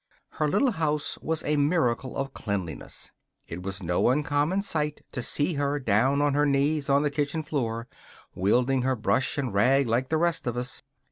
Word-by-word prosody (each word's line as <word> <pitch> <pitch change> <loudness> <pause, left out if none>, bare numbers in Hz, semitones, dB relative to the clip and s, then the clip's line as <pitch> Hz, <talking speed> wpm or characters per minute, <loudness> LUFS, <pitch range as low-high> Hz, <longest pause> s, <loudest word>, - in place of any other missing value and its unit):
Her 155 - -1
little 255 - +2
house 150 -5 -1
was 160 -1 -2
a 150 0 +1
miracle 135 -5 +1
of 135 0 -3
cleanliness. 95 -7 -5 0.4
It 85 +2 -6
was 95 +1 -6
no 90 +5 +2
uncommon 150 +7 +1
sight 150 -5 -1
to 125 - -3
see 145 +7 0
her 145 0 0
down 130 +3 +2
on 145 -1 +2
her 145 +1 +3
knees 140 +1 +1
on 140 +1 +4
the 145 - 0
kitchen 145 +2 -1
floor, 120 -6 -2 0.5
wielding 125 +8 +2
her 130 +1 +1
brush 130 +3 0
and 130 -7 -2
rag 130 +7 +4
like 120 +3 0
the 160 - +2
rest 170 -4 0
of 120 0 -2
us. 125 +2 -3
140 Hz, 185 wpm, -27 LUFS, 120-150 Hz, 0.5 s, on